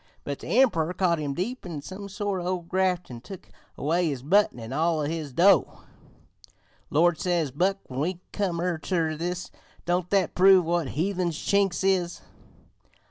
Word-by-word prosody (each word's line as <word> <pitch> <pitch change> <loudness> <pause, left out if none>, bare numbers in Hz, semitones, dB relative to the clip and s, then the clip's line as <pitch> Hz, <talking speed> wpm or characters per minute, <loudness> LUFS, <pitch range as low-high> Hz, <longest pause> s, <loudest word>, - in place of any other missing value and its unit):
But 140 -1 -4
the - - -9
Emprer 180 -9 +2
caught 175 -4 +2
him 145 -2 -3
deep 240 - -3
in 160 -6 -6
some 200 +4 -8
sort 200 -2 -3
o' 185 +1 0
graft 180 -1 -1
an' 120 -1 -8
took 190 +8 -11 0.3
away 165 +5 +1
his 135 -5 -3
button 195 -3 +3
an' 115 +2 -7
all 160 +2 +1
o' - - -1
his 155 -1 -3
dough. 180 +9 +3 1.1
"'Lord!' 170 +2 +3
says 170 -6 0
Buck 185 +8 +1
when 130 0 -7
we 170 +4 -1
come 185 -5 -1 0.2
ter 165 -4 0
this, 180 +3 -4 0.3
'don't 175 0 0
that 195 -5 +1
prove 190 -1 +6
what 170 -2 0
heathens 175 -2 0
Chinks 195 -1 +1
is? 185 -3 +1
175 Hz, 165 wpm, -26 LUFS, 155-190 Hz, 1.1 s, prove